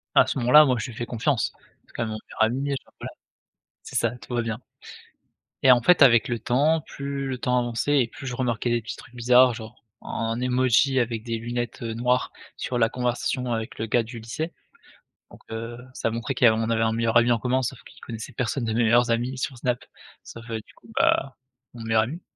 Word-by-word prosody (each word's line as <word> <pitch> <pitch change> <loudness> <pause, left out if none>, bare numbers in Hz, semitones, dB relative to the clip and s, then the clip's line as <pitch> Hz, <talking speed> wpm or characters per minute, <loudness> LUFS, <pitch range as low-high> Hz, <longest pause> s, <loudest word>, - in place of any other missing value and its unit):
À - - +7
ce - - -2
moment-là, 130 +5 +7
moi, 130 -3 +2
je 115 - -4
lui 115 - -10
fais 120 - -3
confiance. 120 0 0 0.3
C'est - - -24
quand 120 - -2
même 110 - -4
mon 110 - -4
meilleur - - -7
ami, 135 +5 0
enfin, - - -26
voilà. - - -6 0.7
C'est - - -10
ça, 115 - +2
tout 120 +2 -10
va 120 - +1
bien. 115 -2 -4 1.0
Et 130 - +8
en 120 - +6
fait, 175 +8 +4
avec 120 -5 +6
le 120 -1 -1
temps, 145 +8 +2
plus 140 -1 -5
le 130 -1 -3
temps 125 0 0
avançait 120 +4 +1
et 120 - 0
plus 125 - -11
je 125 - -3
remarquais 120 -1 -1
des 120 0 +1
petits 110 - -6
trucs 120 - -15
bizarres, 125 +1 +5
genre, 110 0 -10 0.2
un 115 +1 -3
emoji 130 +1 +3
avec 115 -2 -1
des 115 -1 -3
lunettes, 120 0 -4
heu, 115 -1 -3
noires 125 +2 +1 0.2
sur 125 - -3
la 115 -1 +4
conversation 125 +1 -2
avec 115 -1 -3
le 110 - -2
gars 115 +2 +2
du 115 +1 -9
lycée 155 +9 -5 0.8
donc - - -15
heu, 115 +1 -5 0.2
ça 115 - -2
montrait 115 +3 -3
qu'il 125 - 0
y - - +10
av 110 - +4
on 110 +1 -1
avait 115 -1 +1
un 110 - +1
meilleur 115 0 0
ami 120 +1 +3
en 120 - +2
commun, 125 +3 0
sauf 125 0 -4
qu'il - - -17
connaissait 115 -2 -7
personne 125 +1 -2
de 110 - -1
mes 115 +2 +2
meilleurs 120 +1 +4
amis 120 +3 0
sur 130 0 -4
Snap, 125 0 -1 0.4
sauf, 115 +1 -11
heu, 115 - -2
du - - -20
coup, - - -22
bah, 135 -1 +2 0.4
mon 120 - -9
meilleur 110 -1 +2
ami. 155 +10 -7
120 Hz, 235 wpm, -25 LUFS, 115-125 Hz, 1.0 s, y